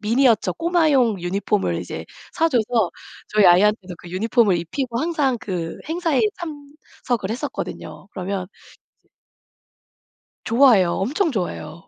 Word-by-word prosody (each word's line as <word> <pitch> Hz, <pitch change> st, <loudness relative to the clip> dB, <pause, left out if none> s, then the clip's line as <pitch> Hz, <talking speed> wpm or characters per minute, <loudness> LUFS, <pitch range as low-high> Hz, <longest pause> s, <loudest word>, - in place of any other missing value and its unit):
미니어처 230 Hz, +1 st, +2 dB
꼬마용 310 Hz, -, +2 dB
유니폼을 195 Hz, +3 st, -1 dB
이제 -, -, -7 dB, 0.3 s
사 330 Hz, -, +2 dB
줘서 230 Hz, -, +1 dB, 0.4 s
저희 210 Hz, -2 st, +4 dB
아이한테도 185 Hz, +1 st, +4 dB
그 175 Hz, -, -12 dB
유니폼을 210 Hz, 0 st, +2 dB
입히고 235 Hz, -, -3 dB
항상 300 Hz, -6 st, 0 dB
그 170 Hz, -4 st, -4 dB
행사에 325 Hz, -3 st, 0 dB, 0.2 s
참석을 285 Hz, -, -5 dB
했었거든요. 225 Hz, -3 st, -6 dB
그러면 185 Hz, -1 st, -4 dB, 0.6 s
이제 -, -, -38 dB, 1.3 s
좋아해요. 230 Hz, -7 st, +5 dB
엄청 300 Hz, -, 0 dB
좋아해요. 170 Hz, -5 st, -5 dB
225 Hz, 305 characters per minute, -22 LUFS, 190-280 Hz, 1.3 s, 좋아해요